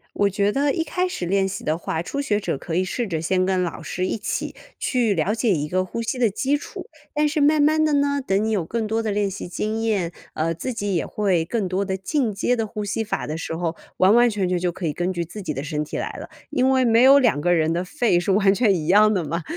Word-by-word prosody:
我 200 Hz, -, +3 dB
觉 200 Hz, +1 st, 0 dB
得 280 Hz, +3 st, +1 dB
一 325 Hz, -, -1 dB
开 365 Hz, +2 st, -1 dB
始 270 Hz, -, -4 dB
练 195 Hz, +2 st, +1 dB
习 195 Hz, -, -6 dB
的 155 Hz, +1 st, 0 dB
话， 160 Hz, -1 st, -3 dB
初 280 Hz, +10 st, -4 dB
学 215 Hz, -8 st, 0 dB
者 195 Hz, -, -3 dB
可 165 Hz, -, -5 dB
以 185 Hz, +2 st, +2 dB
试 230 Hz, +5 st, -3 dB
着 165 Hz, -4 st, -2 dB
先 185 Hz, +2 st, +1 dB
跟 185 Hz, -1 st, +1 dB
老 175 Hz, -, -4 dB
师 185 Hz, +1 st, -3 dB
一 225 Hz, -, -2 dB
起 -, -, -3 dB, 0.2 s
去 240 Hz, -5 st, +1 dB
了 180 Hz, +4 st, 0 dB
解 225 Hz, -1 st, +1 dB
一 150 Hz, -4 st, -1 dB
个 185 Hz, +3 st, 0 dB
呼 230 Hz, +5 st, -4 dB
吸 235 Hz, +3 st, -3 dB
的 240 Hz, -2 st, +3 dB
基 260 Hz, +8 st, -1 dB
础， 375 Hz, +5 st, -9 dB, 0.3 s
但 300 Hz, 0 st, +2 dB
是 300 Hz, +1 st, 0 dB
慢 295 Hz, +1 st, +4 dB
慢 310 Hz, +1 st, +3 dB
地 305 Hz, -1 st, +2 dB
呢， 285 Hz, 0 st, +1 dB
等 205 Hz, -4 st, 0 dB
你 220 Hz, -, 0 dB
有 205 Hz, -5 st, +1 dB
更 220 Hz, +7 st, -3 dB
多 225 Hz, +1 st, -1 dB
的 220 Hz, -, -2 dB
练 205 Hz, -1 st, 0 dB
习 190 Hz, -1 st, -6 dB
经 215 Hz, +4 st, -2 dB
验， 205 Hz, -7 st, 0 dB, 0.2 s
呃， 165 Hz, +1 st, 0 dB
自 235 Hz, +10 st, -4 dB
己 205 Hz, -3 st, -2 dB
也 165 Hz, -, 0 dB
会 185 Hz, -6 st, 0 dB
更 215 Hz, +2 st, -1 dB
多 185 Hz, +2 st, -1 dB
的 190 Hz, -1 st, -2 dB
进 225 Hz, +3 st, -1 dB
阶 225 Hz, +5 st, +1 dB
的 225 Hz, -2 st, -1 dB
呼 210 Hz, 0 st, -5 dB
吸 210 Hz, +2 st, -2 dB
法 220 Hz, -, -3 dB
的 155 Hz, +2 st, -4 dB
时 165 Hz, 0 st, -4 dB
候， 170 Hz, -1 st, -2 dB, 0.2 s
完 190 Hz, +3 st, +5 dB
完 240 Hz, +1 st, +6 dB
全 205 Hz, -4 st, -1 dB
全 180 Hz, 0 st, 0 dB
就 180 Hz, 0 st, 0 dB
可 175 Hz, 0 st, -5 dB
以 150 Hz, -, 0 dB
根 175 Hz, +4 st, -2 dB
据 170 Hz, -1 st, -2 dB
自 190 Hz, +6 st, -9 dB
己 150 Hz, -, -3 dB
的 135 Hz, +2 st, -4 dB
身 150 Hz, -1 st, -2 dB
体 150 Hz, -, -6 dB
来 -, -, -3 dB
了， -, -, -8 dB, 0.2 s
因 255 Hz, 0 st, +2 dB
为 260 Hz, -1 st, +3 dB
没 230 Hz, 0 st, +4 dB
有 270 Hz, +2 st, +8 dB
两 240 Hz, -, +2 dB
个 175 Hz, +3 st, +2 dB
人 160 Hz, -1 st, +2 dB
的 170 Hz, +1 st, -1 dB
肺 185 Hz, 0 st, +1 dB
是 195 Hz, -, 0 dB
完 195 Hz, 0 st, +4 dB
全 210 Hz, -2 st, +3 dB
一 160 Hz, -3 st, -3 dB
样 215 Hz, +3 st, +5 dB
的 180 Hz, -4 st, 0 dB
嘛， 165 Hz, +3 st, -3 dB
200 Hz, 300 characters per minute, -23 LUFS, 175-235 Hz, 0.3 s, 有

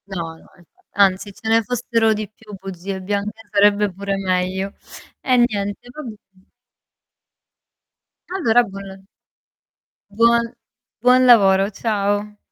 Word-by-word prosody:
No 170 Hz, -2 st, -3 dB, 0.2 s
no, -, -, -21 dB
e -, -, -19 dB, 0.3 s
anzi 195 Hz, 0 st, +2 dB
ce 220 Hz, -, -10 dB
ne 225 Hz, 0 st, +4 dB
fossero 230 Hz, -2 st, +1 dB
di 210 Hz, -1 st, -5 dB
più 210 Hz, -2 st, -12 dB
bugie 190 Hz, 0 st, -6 dB
bianche 205 Hz, +3 st, -3 dB
sarebbe 205 Hz, 0 st, +3 dB
pure 195 Hz, +1 st, -3 dB
meglio. 190 Hz, 0 st, -1 dB, 0.5 s
Eh 255 Hz, -2 st, +2 dB
niente, 205 Hz, +1 st, -4 dB
va 305 Hz, -, -9 dB
bene. 200 Hz, -5 st, -13 dB, 1.9 s
Allora 245 Hz, -9 st, +4 dB
buon 195 Hz, -1 st, -10 dB, 1.0 s
Buon 235 Hz, +2 st, +2 dB, 0.5 s
buon 255 Hz, +1 st, +5 dB
lavoro, 195 Hz, -4 st, +5 dB
ciao. 205 Hz, -1 st, -2 dB
205 Hz, 115 wpm, -20 LUFS, 195-225 Hz, 1.9 s, buon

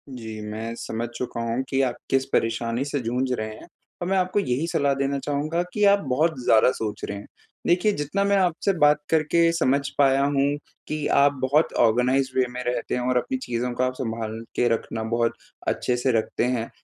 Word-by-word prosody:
जी, 110 Hz, -3 st, -7 dB
मैं 110 Hz, +2 st, -5 dB
समझ 115 Hz, +1 st, -3 dB
चुका 125 Hz, -2 st, -4 dB
हूँ 115 Hz, +3 st, -1 dB
कि 135 Hz, 0 st, +1 dB
आप 125 Hz, -2 st, 0 dB
किस 135 Hz, 0 st, +2 dB
परेशानी 115 Hz, +2 st, 0 dB
से 145 Hz, 0 st, -2 dB
जूझ 125 Hz, +2 st, -1 dB
रहे 110 Hz, -3 st, -1 dB
हैं -, -, -13 dB, 0.3 s
और 175 Hz, -, -2 dB
मैं 195 Hz, +1 st, +1 dB
आपको 185 Hz, +2 st, +1 dB
यही 150 Hz, -4 st, -1 dB
सलाह 140 Hz, -4 st, +1 dB
देना 140 Hz, +1 st, -1 dB
चाहूँगा 150 Hz, +5 st, -1 dB
कि 210 Hz, -, 0 dB
आप 200 Hz, -, +2 dB
बहुत 155 Hz, +3 st, +1 dB
ज़्यादा 110 Hz, +2 st, +5 dB
सोच 110 Hz, -4 st, -4 dB
रहे 100 Hz, -, -4 dB
हैं। 100 Hz, -, -9 dB, 0.4 s
देखिए 180 Hz, +5 st, +3 dB
जितना 190 Hz, +3 st, -1 dB
मैं 200 Hz, 0 st, +2 dB
आपसे 185 Hz, +1 st, +1 dB
बात 150 Hz, 0 st, +5 dB
करके 165 Hz, +1 st, +3 dB
समझ 140 Hz, -4 st, +2 dB, 0.2 s
पाया 135 Hz, -1 st, +4 dB
हूँ 140 Hz, 0 st, +2 dB, 0.3 s
कि 155 Hz, -1 st, -3 dB, 0.2 s
आप 140 Hz, 0 st, +5 dB
बहुत 145 Hz, +5 st, +2 dB
ऑर्गनाइज़्ड 130 Hz, +3 st, +1 dB
वे 130 Hz, -, +4 dB
में 125 Hz, -, -4 dB
रहते 120 Hz, -1 st, -2 dB
हैं 125 Hz, -, -1 dB
और 125 Hz, -, +2 dB
अपनी 260 Hz, -, -1 dB
चीज़ों 125 Hz, -, -3 dB
को 125 Hz, -, -1 dB
आप 130 Hz, 0 st, 0 dB
संभाल 115 Hz, -3 st, -4 dB, 0.2 s
के 120 Hz, -, +2 dB
रखना, 110 Hz, 0 st, -3 dB
बहुत 115 Hz, +1 st, 0 dB, 0.3 s
अच्छे 125 Hz, -, 0 dB
से 130 Hz, +2 st, +1 dB
रखते 110 Hz, -, -1 dB
हैं। 120 Hz, -2 st, -1 dB
130 Hz, 205 wpm, -24 LUFS, 115-150 Hz, 0.4 s, ज़्यादा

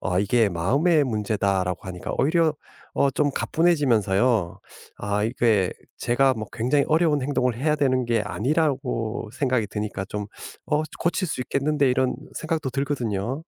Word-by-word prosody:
아 90 Hz, -1 st, 0 dB
이게 105 Hz, +2 st, +3 dB
"마음의 140 Hz, -, +2 dB
문제다."라고 100 Hz, -5 st, -1 dB
하니까 90 Hz, -1 st, -5 dB
오히려 160 Hz, +3 st, +3 dB, 0.4 s
어 140 Hz, -, +3 dB
좀 145 Hz, +2 st, +1 dB
가뿐해지면서요 120 Hz, -, +2 dB, 0.4 s
아 100 Hz, +1 st, -1 dB
이게 110 Hz, -5 st, +2 dB, 0.3 s
제가 130 Hz, +2 st, +2 dB
뭐 110 Hz, -1 st, -5 dB
굉장히 130 Hz, +5 st, +1 dB
어려운 155 Hz, -3 st, +2 dB
행동을 125 Hz, -3 st, 0 dB
해야 150 Hz, +4 st, +1 dB
되는 130 Hz, -3 st, +1 dB
게 115 Hz, -2 st, +1 dB
아니라고 125 Hz, -3 st, -1 dB
생각이 130 Hz, -5 st, 0 dB
드니까 105 Hz, -2 st, -4 dB
좀 105 Hz, 0 st, -4 dB, 0.4 s
'어 150 Hz, 0 st, +1 dB, 0.2 s
고칠 175 Hz, +2 st, 0 dB
수 130 Hz, -, -3 dB
있겠는데.' 140 Hz, +1 st, +1 dB
이런 130 Hz, 0 st, +1 dB, 0.2 s
생각도 155 Hz, -4 st, -2 dB
들거든요. 125 Hz, -5 st, -2 dB
125 Hz, 330 characters per minute, -24 LUFS, 105-145 Hz, 0.4 s, 이게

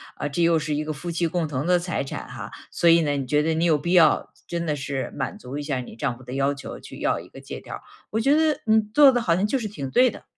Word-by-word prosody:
啊， -, -, -3 dB
这 145 Hz, +4 st, -1 dB
又 165 Hz, -1 st, +4 dB
是 150 Hz, -1 st, -2 dB
一 150 Hz, +1 st, -2 dB
个 155 Hz, -, -3 dB
夫 175 Hz, +5 st, -7 dB
妻 170 Hz, 0 st, 0 dB
共 170 Hz, -1 st, -1 dB
同 140 Hz, -1 st, -3 dB
的 180 Hz, 0 st, +3 dB
财 175 Hz, -4 st, -2 dB
产 135 Hz, -, -7 dB
哈。 -, -, -8 dB, 0.2 s
所 170 Hz, -, 0 dB
以 165 Hz, 0 st, +7 dB
呢， 145 Hz, -2 st, 0 dB
你 135 Hz, -, -2 dB
觉 150 Hz, +4 st, +2 dB
得 160 Hz, +1 st, 0 dB
你 165 Hz, -, +1 dB
有 165 Hz, -2 st, +4 dB
必 150 Hz, +4 st, -2 dB
要 165 Hz, -4 st, +4 dB, 0.2 s
真 170 Hz, -1 st, -3 dB
的 150 Hz, -, 0 dB
是 135 Hz, -1 st, -4 dB
满 -, -, -4 dB
足 130 Hz, +3 st, -7 dB
一 145 Hz, -, -4 dB
下 140 Hz, -3 st, -2 dB
你 125 Hz, -, -8 dB
丈 125 Hz, +1 st, -2 dB
夫 130 Hz, -, -15 dB
的 125 Hz, -, -8 dB
要 140 Hz, +1 st, +1 dB
求 140 Hz, -, -8 dB
去 -, -, -11 dB
要 -, -, 0 dB
一 -, -, -11 dB
个 -, -, -13 dB
借 -, -, -7 dB
条 -, -, -10 dB
儿， -, -, -7 dB, 0.3 s
我 220 Hz, -, 0 dB
觉 275 Hz, +6 st, +4 dB
得 310 Hz, -1 st, +2 dB
你 220 Hz, 0 st, +5 dB
做 285 Hz, -2 st, +8 dB
的 245 Hz, -, +1 dB
好 175 Hz, -8 st, +2 dB
像 190 Hz, +4 st, +1 dB
就 270 Hz, -, 0 dB
是 225 Hz, -4 st, -3 dB
挺 140 Hz, -10 st, -6 dB
对 250 Hz, -, +4 dB
的。 -, -, -12 dB
160 Hz, 330 characters per minute, -24 LUFS, 140-180 Hz, 0.3 s, 做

